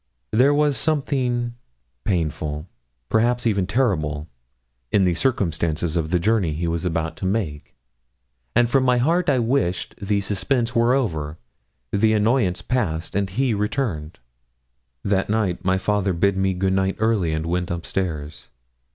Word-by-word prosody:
There 125 Hz, +6 st, +5 dB
was 145 Hz, -1 st, +2 dB
something 130 Hz, -6 st, 0 dB, 0.5 s
painful, 75 Hz, -3 st, -2 dB, 0.4 s
perhaps 120 Hz, -, +1 dB
even 100 Hz, -5 st, +1 dB
terrible, 80 Hz, -, 0 dB, 0.6 s
in 100 Hz, -, +4 dB
the 90 Hz, -2 st, +3 dB
circumstances 85 Hz, -, 0 dB
of 80 Hz, -2 st, 0 dB
the 90 Hz, -, +2 dB
journey 95 Hz, -3 st, +1 dB
he 85 Hz, +3 st, -2 dB
was 85 Hz, +1 st, -2 dB
about 80 Hz, -2 st, -1 dB
to -, -, -4 dB
make, 75 Hz, -, -3 dB, 0.8 s
and 120 Hz, 0 st, +5 dB
from 130 Hz, +2 st, +2 dB
my 125 Hz, -1 st, +3 dB
heart 165 Hz, +8 st, +2 dB
I 135 Hz, -, +3 dB
wished 120 Hz, -6 st, 0 dB
the 100 Hz, 0 st, +1 dB
suspense 115 Hz, +5 st, 0 dB
were 120 Hz, +2 st, +4 dB
over, 80 Hz, -, -2 dB, 0.5 s
the 110 Hz, +2 st, +3 dB
annoyance 110 Hz, -3 st, +2 dB
past, 85 Hz, -11 st, -1 dB
and 100 Hz, -1 st, 0 dB
he 120 Hz, +5 st, 0 dB
returned. 105 Hz, -, -2 dB, 0.9 s
That 100 Hz, -1 st, 0 dB
night 105 Hz, -5 st, 0 dB
my 95 Hz, +1 st, +2 dB
father 100 Hz, -1 st, 0 dB
bid 100 Hz, +3 st, +2 dB
me 95 Hz, 0 st, +1 dB
good 95 Hz, +1 st, +1 dB
night 95 Hz, 0 st, +1 dB
early 110 Hz, -7 st, +1 dB
and 80 Hz, 0 st, -2 dB
went 90 Hz, +1 st, -1 dB
upstairs. 85 Hz, -3 st, -4 dB
100 Hz, 145 wpm, -23 LUFS, 85-120 Hz, 0.9 s, There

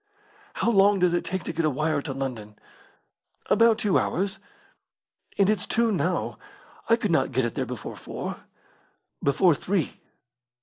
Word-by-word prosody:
"How 235 Hz, -, +1 dB
long 200 Hz, -1 st, +5 dB
does 180 Hz, -2 st, +2 dB
it 175 Hz, -, +1 dB
take 190 Hz, -1 st, -4 dB
to -, -, -4 dB
get 165 Hz, +1 st, -1 dB
a 155 Hz, -, +3 dB
wire 150 Hz, +1 st, 0 dB
to 145 Hz, -, -5 dB
London?" 125 Hz, -6 st, -5 dB, 1.0 s
"About 230 Hz, +1 st, +5 dB
two 205 Hz, -3 st, +2 dB
hours." 195 Hz, +3 st, -1 dB, 1.0 s
"And 195 Hz, -, +4 dB
it's 210 Hz, -3 st, 0 dB
two 230 Hz, -1 st, +2 dB
now. 200 Hz, -, -1 dB, 0.5 s
I 230 Hz, -, +7 dB
could 215 Hz, -5 st, -2 dB
not 160 Hz, -, +2 dB
get 130 Hz, 0 st, +1 dB
it 120 Hz, -, -3 dB
there -, -, -2 dB
before -, -, -6 dB
four." -, -, -6 dB, 0.8 s
"Before 165 Hz, +5 st, +4 dB
three." 180 Hz, +2 st, -2 dB
180 Hz, 160 wpm, -26 LUFS, 145-205 Hz, 1.0 s, I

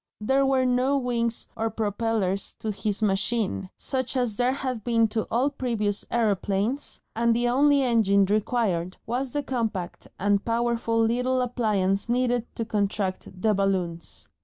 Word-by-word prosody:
There 265 Hz, +5 st, +2 dB
were 265 Hz, -1 st, +2 dB
no 255 Hz, +3 st, +2 dB
wings 235 Hz, -3 st, -1 dB
or 225 Hz, 0 st, -1 dB
propellers 210 Hz, -2 st, -1 dB
to 220 Hz, -, -3 dB
his 210 Hz, +1 st, -2 dB
machine, 200 Hz, -1 st, 0 dB
such 260 Hz, 0 st, -1 dB
as 245 Hz, -4 st, 0 dB
there 245 Hz, +2 st, +2 dB
had 260 Hz, -4 st, -3 dB
been 230 Hz, -1 st, +3 dB
to 220 Hz, 0 st, -2 dB
all 255 Hz, +5 st, +1 dB
previous 220 Hz, -7 st, -1 dB
aeroplanes, 215 Hz, +3 st, 0 dB, 0.2 s
and 230 Hz, 0 st, +2 dB
the 240 Hz, +1 st, +1 dB
only 280 Hz, +2 st, +4 dB
engine 210 Hz, -5 st, +3 dB
required 200 Hz, -4 st, 0 dB
was 250 Hz, +3 st, -2 dB
the 290 Hz, -, -1 dB
compact 225 Hz, -9 st, -3 dB
and 200 Hz, +1 st, +1 dB
powerful 230 Hz, 0 st, 0 dB
little 250 Hz, +3 st, +2 dB
appliance 215 Hz, -5 st, 0 dB
needed 245 Hz, -1 st, +1 dB
to 230 Hz, -, -2 dB
contract 200 Hz, -3 st, -1 dB, 0.2 s
the 215 Hz, -1 st, +4 dB
balloons. 185 Hz, -4 st, -2 dB
230 Hz, 145 wpm, -26 LUFS, 205-250 Hz, 0.2 s, only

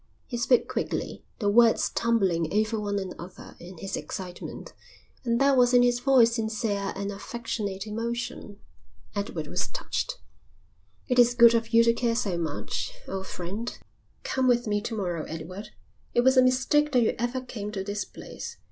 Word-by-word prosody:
He 245 Hz, -, -6 dB
spoke 240 Hz, +1 st, +3 dB
quickly, -, -, -3 dB
the 205 Hz, -, -1 dB
words 230 Hz, +2 st, +5 dB
tumbling 190 Hz, -9 st, +1 dB
over 215 Hz, +2 st, +1 dB
one 205 Hz, -1 st, -2 dB
another 185 Hz, -2 st, -7 dB
in 180 Hz, +1 st, -11 dB
his 195 Hz, +4 st, -4 dB
excitement, 180 Hz, -2 st, -7 dB, 0.5 s
and 235 Hz, -1 st, +1 dB
there 275 Hz, 0 st, +4 dB
was 250 Hz, -1 st, +4 dB
in 245 Hz, -, +7 dB
his 245 Hz, 0 st, +3 dB
voice 245 Hz, -3 st, +5 dB
sincere 215 Hz, -3 st, -1 dB
and 200 Hz, +1 st, -3 dB
affectionate 205 Hz, -2 st, -4 dB
emotion. 230 Hz, -1 st, -4 dB, 0.6 s
Edward 200 Hz, 0 st, -3 dB
was -, -, -1 dB
touched. -, -, -3 dB, 0.9 s
"It 250 Hz, -1 st, +2 dB
is 245 Hz, 0 st, +6 dB
good 235 Hz, -1 st, +8 dB
of 230 Hz, 0 st, 0 dB
you 230 Hz, 0 st, +6 dB
to 230 Hz, 0 st, +4 dB
care 235 Hz, -1 st, 0 dB
so 205 Hz, -6 st, 0 dB
much, 165 Hz, -, -3 dB, 0.2 s
old 190 Hz, 0 st, -4 dB
friend." 200 Hz, +7 st, -5 dB, 0.5 s
"Come 260 Hz, -1 st, 0 dB
with 240 Hz, -1 st, +3 dB
me 205 Hz, -1 st, 0 dB
to 225 Hz, +1 st, -4 dB
morrow, 175 Hz, -5 st, -2 dB
Edward. 185 Hz, +6 st, -7 dB, 0.5 s
It 240 Hz, -, +5 dB
was 260 Hz, +2 st, +4 dB
a 255 Hz, -, +7 dB
mistake 260 Hz, +4 st, +3 dB
that 250 Hz, -2 st, +5 dB
you -, -, +2 dB
ever 240 Hz, +2 st, -1 dB
came 220 Hz, -5 st, -6 dB
to 195 Hz, -2 st, -3 dB
this 205 Hz, +1 st, -3 dB
place. -, -, -9 dB
225 Hz, 170 wpm, -27 LUFS, 200-245 Hz, 0.9 s, good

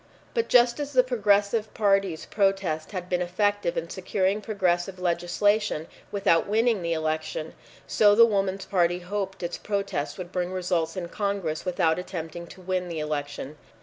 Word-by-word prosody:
But 460 Hz, -2 st, 0 dB
just 240 Hz, +1 st, +4 dB
as 290 Hz, -1 st, -4 dB
the 255 Hz, -1 st, +6 dB
Progressive 210 Hz, -2 st, +1 dB
Party's 195 Hz, -5 st, +1 dB
protest 195 Hz, -6 st, 0 dB
had 180 Hz, -3 st, -5 dB
been 180 Hz, -1 st, 0 dB
effective 205 Hz, +1 st, 0 dB
in 165 Hz, -, -2 dB
securing 190 Hz, +3 st, -1 dB
progressive 185 Hz, -3 st, 0 dB
legislation 180 Hz, +1 st, +1 dB, 0.3 s
without 195 Hz, -5 st, +2 dB
winning 220 Hz, 0 st, +2 dB
the 170 Hz, -1 st, -1 dB
election, 155 Hz, 0 st, -2 dB, 0.3 s
so 205 Hz, -1 st, +4 dB
the 230 Hz, +1 st, +8 dB
Woman's 195 Hz, -3 st, 0 dB
Party 175 Hz, -2 st, +2 dB
hoped 190 Hz, +1 st, -4 dB
its 175 Hz, -, -3 dB
protest 195 Hz, -9 st, -2 dB
would 180 Hz, -1 st, -7 dB
bring 180 Hz, 0 st, -2 dB
results 180 Hz, -2 st, -1 dB
in 175 Hz, -2 st, -3 dB
Congress 200 Hz, -7 st, -2 dB
without 175 Hz, -2 st, +1 dB
attempting 170 Hz, -2 st, -6 dB
to 185 Hz, -, -13 dB
win 185 Hz, 0 st, -2 dB
the 170 Hz, -2 st, -5 dB
election. 145 Hz, -1 st, -4 dB
185 Hz, 155 wpm, -26 LUFS, 170-205 Hz, 0.3 s, the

